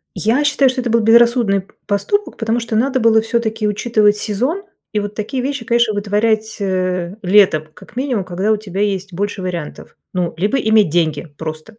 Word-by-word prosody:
Я 235 +7 +1
считаю, 290 -2 +3
что 255 0 -2
это 245 - -3
был 230 0 +3
безрассудный 230 -3 +4
п 190 - -25
поступок, 310 - -1
потому 225 +1 0
что 230 -1 -4
надо 260 +4 +1
было 225 -1 +4
всё-таки 225 -1 -1
учитывать 210 0 +2
сезон 250 - -2 0.3
и 210 - +1
вот 205 0 -5
такие 245 +5 -3
вещи, 275 -3 -3
конечно, 235 -1 +2
вытворять, 215 +1 0
э, 185 -2 -1
летом, 185 -5 +4
как 210 +3 -16
минимум, 255 -6 -1
когда 185 +4 -1
у 215 - +2
тебя 200 -2 -5
есть 195 -2 -2
больше 205 +2 -3
вариантов. 175 -4 -6 0.2
Ну, 180 -2 -1
либо 205 +9 +1
иметь 220 -6 +3
деньги 160 0 0
просто 155 +6 -7
215 Hz, 185 wpm, -18 LUFS, 195-235 Hz, 0.3 s, безрассудный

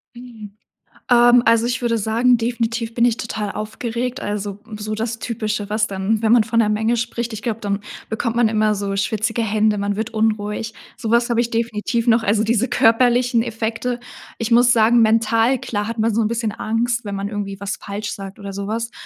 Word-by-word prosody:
Mhm. 230 -4 -11 0.6
Ähm, 240 0 +6
also 230 0 +4
ich 245 +1 -1
würde 230 -1 +1
sagen, 235 +4 +3
definitiv 230 0 -2
bin 235 - +2
ich 240 -2 +3
total 215 -3 -4
aufgeregt. 235 +3 -4
Also 205 -1 -4 0.2
so 215 +1 -4
das 225 +1 -3
typische, 215 -3 -3
was 215 +1 +1
dann 200 +3 -1
wenn 220 +1 +3
man 235 -3 +5
von 230 +1 +1
'ner 210 - +2
Menge 220 +3 +1
spricht, 235 0 -3
ich 220 - -6
glaube 225 -1 -3
dann 200 -1 -2 0.3
bekommt 230 +1 -2
man 235 -2 +4
immer 215 -1 +2
so 200 0 -3
schwitzige 220 +3 -1
Hände. 215 -1 +1
Man 200 0 -1
wird 220 +2 -3
unruhig. 215 0 -1 0.2
Sowas 235 +1 +1
habe 235 - +2
ich 235 0 -1
definitiv 230 +1 -1
noch. 230 0 +4
Also 210 +2 +2
diese 235 +3 +1
körperlichen 245 +1 +3
Effekte. 230 +2 -3 0.4
Ich 230 0 -3
muss 240 +1 +5
sagen, 235 +1 +4
mental, 225 +3 +3
klar, 210 -1 -3
hat 230 0 -5
man 220 0 +1
so 230 - +2
'n 210 - +1
bisschen 225 -1 -2
Angst, 230 +2 -1
wenn 200 -1 -4
man 200 0 -3
irgendwie 200 -2 -5
was 200 0 -3
falsch 205 +1 -5
sagt 195 -1 -8
oder 200 -1 -7
sowas. 215 +4 -3
225 Hz, 200 wpm, -20 LUFS, 210-235 Hz, 0.6 s, Ähm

